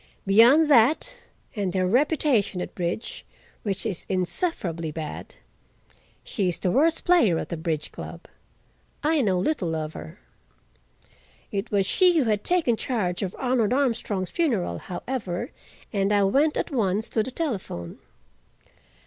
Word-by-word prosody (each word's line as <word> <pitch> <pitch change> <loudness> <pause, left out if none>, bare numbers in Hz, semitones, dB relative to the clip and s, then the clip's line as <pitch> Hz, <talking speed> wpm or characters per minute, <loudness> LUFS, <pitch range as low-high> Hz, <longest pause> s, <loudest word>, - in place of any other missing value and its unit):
Beyond 235 +11 +6
that, 290 - +3 0.3
and 195 -3 -2
her 185 -1 +2
reputation 250 - +2
at - - -5
bridge, 175 +5 -4 0.4
which 200 -1 -3
is 200 -6 -3
insufferably 180 - -1
bad—she 160 +5 -8
is 175 - -2
the 180 - 0
worst 320 - +2
player 325 - +4
at - - -4
the 170 - -3
bridge 160 -2 -3
club—I 310 0 -5
know 195 -6 +1
little 180 - -1
of 155 0 -4
her. 80 0 -9 1.3
It 200 +3 -3
was 200 -3 +1
she 360 - +4
who 300 - +4
had 210 -3 0
taken 340 -10 +2
charge 210 -8 -2
of 190 -3 -3
Arnold 245 -3 +1
Armstrong's 225 -8 -1
funeral, 225 - 0
however, 205 +1 -4 0.4
and 200 0 +1
I 205 -1 +4
went 280 +10 +2
at - - -2
once 215 -4 0
to 220 - +1
the 215 - -3
telephone. 215 - -4
210 Hz, 135 wpm, -25 LUFS, 180-270 Hz, 1.3 s, Beyond